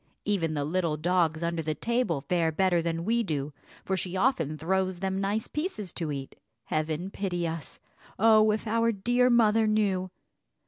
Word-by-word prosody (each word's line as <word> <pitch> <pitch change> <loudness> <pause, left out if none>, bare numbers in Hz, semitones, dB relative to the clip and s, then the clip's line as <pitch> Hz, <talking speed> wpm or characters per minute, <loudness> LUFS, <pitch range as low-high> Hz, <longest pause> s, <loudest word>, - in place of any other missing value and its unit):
Even 165 -7 0
the 145 -1 -1
little 165 -1 0
dogs 165 -1 +1
under 170 -1 -1
the 155 -1 -2
table 235 - 0
fare 165 +2 +1
better 175 +1 +2
than 165 0 -2
we 235 +3 +2
do, 150 -7 -3 0.3
for 190 - 0
she 185 0 -3
often 165 - +1
throws 185 +3 0
them 190 +1 -2
nice 205 +3 -1
pieces 300 - -4
to 160 -3 -3
eat. 135 -1 -6 0.3
Heaven 155 +6 -2
pity 175 -4 -2
us! 160 -2 -6 0.4
Oh, 215 0 +5
if 215 +1 0
our 230 +1 +2
dear 245 +5 +2
mother 225 -2 +4
knew! 200 -4 +1
185 Hz, 170 wpm, -28 LUFS, 160-215 Hz, 0.4 s, Oh